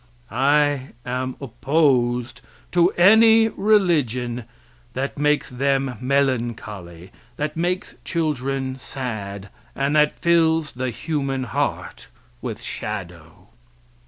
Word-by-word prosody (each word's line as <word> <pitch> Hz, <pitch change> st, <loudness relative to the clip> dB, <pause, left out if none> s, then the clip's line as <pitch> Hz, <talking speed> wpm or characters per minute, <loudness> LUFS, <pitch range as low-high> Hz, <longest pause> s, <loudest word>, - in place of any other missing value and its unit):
I 140 Hz, +2 st, +2 dB
am 130 Hz, +1 st, -3 dB
opposed 130 Hz, -2 st, +1 dB, 0.3 s
to 175 Hz, 0 st, +4 dB
any 220 Hz, +4 st, +6 dB
religion 145 Hz, -, +1 dB, 0.5 s
that 135 Hz, +2 st, -3 dB
makes 150 Hz, -1 st, +1 dB
them 135 Hz, 0 st, 0 dB
melancholy, 115 Hz, -10 st, -2 dB, 0.3 s
that 150 Hz, 0 st, -2 dB
makes 175 Hz, +3 st, -2 dB
children 135 Hz, -4 st, -2 dB
sad, 100 Hz, -7 st, -6 dB, 0.3 s
and 140 Hz, +2 st, 0 dB
that 150 Hz, 0 st, +3 dB
fills 165 Hz, -2 st, +3 dB
the 130 Hz, +1 st, -3 dB
human 135 Hz, 0 st, -2 dB
heart 125 Hz, -, -3 dB, 0.3 s
with -, -, -5 dB
shadow. 90 Hz, -6 st, -7 dB
135 Hz, 95 wpm, -22 LUFS, 120-155 Hz, 0.5 s, any